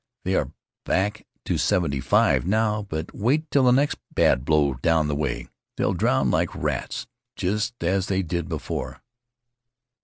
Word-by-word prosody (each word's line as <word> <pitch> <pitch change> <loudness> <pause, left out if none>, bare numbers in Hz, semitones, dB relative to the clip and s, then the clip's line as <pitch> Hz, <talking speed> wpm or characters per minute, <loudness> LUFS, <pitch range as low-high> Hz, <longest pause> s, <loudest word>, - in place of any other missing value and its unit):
They 95 - -1
are 70 -6 0 0.3
back 105 +3 -1 0.2
to - - 0
seventy 75 -7 +1
five 65 - +3
now, 105 +3 +1
but 80 +1 -4
wait 145 +9 0
till 140 -2 +4
the 125 - +6
next 140 +3 +2
bad 65 - +3
blow 75 -2 +2
down 80 +2 +1
that 75 - -1
way. 70 0 -2 0.3
They'll - - +1
drown - - +2
like - - 0
rats - - -3 0.3
just 105 +3 -2
as 95 +2 +1
they 95 0 0
did 85 -1 -3
before. - - -5
95 Hz, 155 wpm, -24 LUFS, 75-110 Hz, 0.3 s, the